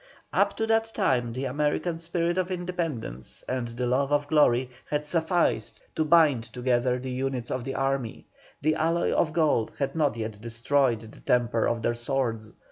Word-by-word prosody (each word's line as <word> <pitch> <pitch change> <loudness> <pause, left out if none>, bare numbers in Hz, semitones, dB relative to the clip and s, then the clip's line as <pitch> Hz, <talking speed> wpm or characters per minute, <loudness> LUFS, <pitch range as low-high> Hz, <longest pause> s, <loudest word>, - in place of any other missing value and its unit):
Up - - +2
to 225 - +1
that 225 0 +1
time 125 - +1
the 130 +3 -3
American 150 +5 -1
spirit 170 +1 -1
of 185 0 -1
independence 170 - -3
and 125 -2 -2
the 120 +2 -3
love 135 +3 +1
of 145 0 +2
glory 130 -5 +3 0.2
had 150 0 -1
sufficed 165 +2 0
to 160 - +2
bind 155 -7 +4
together 125 +1 0
the 130 +1 -5
units 130 -1 -2
of 130 - -2
the 135 - -4
army; 135 -4 -2 0.4
the 155 +1 +3
alloy 165 +2 +1
of 155 - +2
gold 155 -9 +1
had 140 +1 -2
not 150 -6 +1
yet 110 -2 -5
destroyed 120 +1 +1
the 110 -1 -13
temper 120 -2 +1
of 115 -1 -1
their 120 - +2
swords. 120 -3 -2
135 Hz, 175 wpm, -27 LUFS, 120-160 Hz, 0.4 s, bind